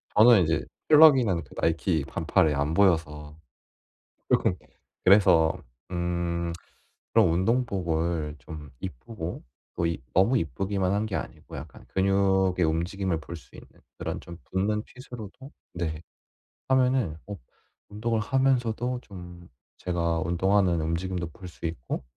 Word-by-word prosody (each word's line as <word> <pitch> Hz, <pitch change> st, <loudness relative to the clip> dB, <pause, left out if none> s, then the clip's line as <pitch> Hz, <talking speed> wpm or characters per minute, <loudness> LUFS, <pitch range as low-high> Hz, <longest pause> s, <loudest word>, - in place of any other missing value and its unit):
저는 110 Hz, -2 st, +7 dB
인제 80 Hz, 0 st, 0 dB, 0.2 s
펄럭이는 130 Hz, -, +6 dB
그 70 Hz, -, -17 dB
나이키 80 Hz, -1 st, +1 dB
반팔에 75 Hz, -2 st, +1 dB
안 75 Hz, +3 st, -1 dB
보여서 80 Hz, -5 st, +1 dB, 0.9 s
쪼끔. 90 Hz, -, +3 dB, 0.5 s
그래서 90 Hz, -5 st, +6 dB, 0.4 s
음 85 Hz, -1 st, -2 dB, 0.6 s
그럼 80 Hz, -, +5 dB
운동복을 85 Hz, -7 st, 0 dB
좀 75 Hz, +2 st, -10 dB
이쁘고 85 Hz, -, -6 dB, 0.3 s
또 85 Hz, -, 0 dB
이 85 Hz, -, -1 dB, 0.2 s
너무 95 Hz, +8 st, +4 dB
이쁘기만 95 Hz, -2 st, -1 dB
한 105 Hz, +2 st, 0 dB
게 100 Hz, -, -5 dB
아니고 -, -, -7 dB
약간 -, -, -10 dB
근육의 95 Hz, -1 st, +2 dB
움직임을 85 Hz, +1 st, -1 dB
볼 85 Hz, +2 st, -8 dB
수 80 Hz, -, -17 dB
있는 -, -, -13 dB, 0.3 s
그런 -, -, -4 dB
좀 85 Hz, -, -10 dB
붙는 105 Hz, +3 st, 0 dB
핏으로도 125 Hz, +1 st, -11 dB, 0.2 s
네 80 Hz, -2 st, -3 dB, 0.7 s
하면은 130 Hz, -10 st, +2 dB
어 100 Hz, -, -5 dB, 0.5 s
운동을 110 Hz, +2 st, -1 dB
하면서도 125 Hz, -1 st, +1 dB
좀 90 Hz, -3 st, -11 dB, 0.3 s
제가 85 Hz, -2 st, -1 dB
운동하는 90 Hz, 0 st, +2 dB
움직임도 85 Hz, +1 st, -2 dB
볼 90 Hz, +2 st, -11 dB
수 85 Hz, -, -9 dB
있고 70 Hz, -5 st, -4 dB
90 Hz, 265 characters per minute, -27 LUFS, 80-105 Hz, 0.9 s, 저는